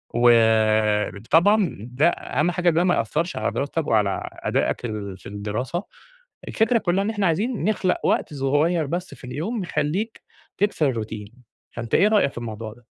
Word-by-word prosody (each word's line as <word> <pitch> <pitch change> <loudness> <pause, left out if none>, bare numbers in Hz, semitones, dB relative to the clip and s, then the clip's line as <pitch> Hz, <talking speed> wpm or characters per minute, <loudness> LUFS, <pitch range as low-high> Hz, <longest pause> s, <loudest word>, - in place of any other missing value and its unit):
وطبعًا 110 - +3
ده 150 +7 +3
أهم 155 +1 -1
حاجة 180 0 +2
ده 170 +2 +2
ما 180 - +3
يأثّرش 165 +10 -1
على - - -1
دراستك 150 +2 -2
وعلى 105 -3 +1
أداءك - - -1 0.4
في - - -21
الدراسة. 110 - -3 0.6
الفكرة 225 +1 +2
كلها 190 +1 +1
إن 210 - -1
إحنا 205 -4 0
عايزين 210 +6 -1
نخلق 195 -4 +1
وقت - - +1
صغير 145 +5 +1
بس 175 +4 -4
في - - -19
اليوم، 165 - -3
يخليك 175 +7 -2 0.4
تكسر 185 -8 +1
الروتين، 110 -2 -5 0.4
فأنت 115 -1 -3
إيه 200 - +5
رأيك 210 -10 +3
في - - -16
الموضوع 110 -2 -6
ده؟ 120 -1 -22
150 Hz, 150 wpm, -23 LUFS, 115-180 Hz, 0.6 s, إيه